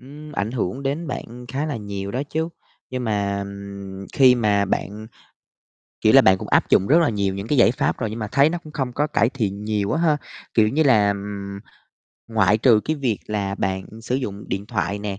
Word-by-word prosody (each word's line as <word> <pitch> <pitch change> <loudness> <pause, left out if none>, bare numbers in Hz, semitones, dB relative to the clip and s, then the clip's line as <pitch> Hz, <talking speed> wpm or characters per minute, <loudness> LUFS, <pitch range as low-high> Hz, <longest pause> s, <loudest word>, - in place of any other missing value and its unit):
ừm, 150 +4 -11
ảnh 105 -5 -2
hưởng 120 +1 -3
đến 145 +5 -2
bạn 125 -1 -6
khá 140 +6 -2
là 150 - -3
nhiều 100 -2 -5
đó 125 +6 -2
chứ. 160 +3 -2 0.4
Nhưng 125 -1 -3
mà, 100 -2 0
ừm, 100 -1 -8
khi 130 -4 +6
mà 105 -4 +2
bạn 105 +2 -3 1.0
kiểu - - +4
là, - - +9
bạn 95 0 +5
cũng - - -7
áp - - +3
dụng 95 - +4
rất 160 +5 +5
là 160 - +3
nhiều 100 -3 -1
những 100 +2 -5
cái 145 - +1
giải 120 - +6
pháp - - -1
rồi, 110 -3 -2
nhưng 110 - -6
mà 110 - -3
thấy 140 +3 +5
nó 175 - -2
cũng 155 - -12
không 130 -4 -2
có 150 +3 0
cải 115 -6 +2
thiện 105 -6 -3
nhiều 105 -2 -1
á 160 - 0
ha. 155 -3 +3 0.4
Kiểu 110 -2 +4
như 145 +8 +2
là, 110 -8 +5
ừm, 100 0 -5 0.7
ngoại 105 -2 +3
trừ, 110 -2 +5
cái 155 0 -1
việc 125 -7 -1
là 100 -2 -2
bạn 95 -1 -2 0.2
sử 125 - -2
dụng 105 -6 -3
điện 100 +1 -3
thoại 100 -3 -2
nè, 100 -1 -4
110 Hz, 225 wpm, -22 LUFS, 100-135 Hz, 1.0 s, là